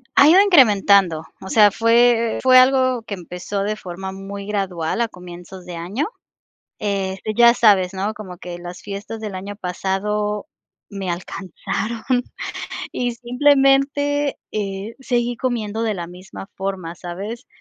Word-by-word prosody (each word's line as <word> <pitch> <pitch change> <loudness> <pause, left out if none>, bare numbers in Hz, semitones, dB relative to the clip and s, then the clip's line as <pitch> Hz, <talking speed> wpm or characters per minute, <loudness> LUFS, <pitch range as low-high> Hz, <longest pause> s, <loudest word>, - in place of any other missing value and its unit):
Ha 285 - +7
ido 355 +5 +8
incrementando. 200 - +5 0.2
O 190 - -8
sea, 210 -1 +6
fue 230 +1 +3
fue 255 0 +7
algo 255 -1 +4
que 220 - -6
empezó 180 +2 -5
de 210 +1 -1
forma 190 0 -7
muy 195 +1 -7
gradual 190 -4 -2
a 235 - +2
comienzos 180 -1 -11
de 180 -1 -7
año. 190 - -2 0.7
Este, 195 0 -2
ya 235 0 +7
sabes, 200 -6 +4
¿no? 195 +3 -2
Como 190 -5 -10
que 175 0 -7
las 175 +1 -9
fiestas 205 +2 -6
del 210 -3 -5
año 200 +2 -6
pasado 210 +4 -2 0.4
me 195 -3 -4
alcanzaron 190 +5 -4 0.9
y 245 -1 -2
simplemente, 275 +3 +2
eh, 200 +1 -4
seguí 245 -2 -1
comiendo 225 -3 -2
de 220 -2 0
la 175 -3 -5
misma 185 +2 -10
forma, 190 -4 -4
¿sabes? 195 +8 -7
205 Hz, 140 wpm, -21 LUFS, 190-235 Hz, 0.9 s, ido